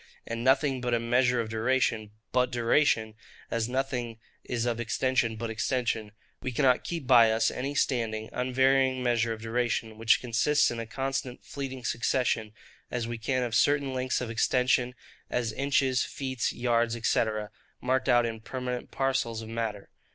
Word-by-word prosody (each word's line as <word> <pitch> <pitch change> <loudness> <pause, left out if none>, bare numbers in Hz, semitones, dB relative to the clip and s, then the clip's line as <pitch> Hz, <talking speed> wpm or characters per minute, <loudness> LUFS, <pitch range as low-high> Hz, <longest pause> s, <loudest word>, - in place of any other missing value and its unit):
And 115 0 -4
nothing 135 0 +3
being 120 -1 +1
a - - +1
measure 120 +1 +2
of 110 - -5
duration 110 -1 0 0.2
but 125 0 +2
duration, 115 -2 +2 0.4
as 115 0 -1
nothing 125 -3 -2 0.3
is 120 -1 -2
of 120 -1 -1
extension 120 0 0
but 115 +1 -4
extension, 110 -2 -1 0.3
we 130 - -3
cannot 130 0 +3
keep 170 -5 -4
by 120 -3 +6
us 110 0 +2
any 140 +3 -4
standing, 110 -6 0
unvarying 130 +1 +2
measure 120 -2 +1
of 110 0 -5
duration, 115 -1 -1
which 115 0 +4
consists 125 +5 +2
in 120 - -4
a 115 - -5
constant 135 0 -4
fleeting 130 -3 -6
succession, 115 -2 0 0.4
as 120 -2 -2
we 120 -1 -5
can 130 +3 0
of 120 -2 -3
certain 140 +2 +2
lengths 130 0 -1
of 120 -2 -4
extension, 125 +2 +2 0.3
as 115 -3 -1
inches, 135 -1 +1
feet, 130 -3 -2
yards, 120 -1 +1
&c., - - +3 0.6
marked 130 +1 0
out 120 -1 +5
in 115 -1 -4
permanent 125 +1 -5
parcels 130 -4 -1
of 110 - -9
matter. 115 -3 -4
120 Hz, 160 wpm, -28 LUFS, 115-130 Hz, 0.6 s, by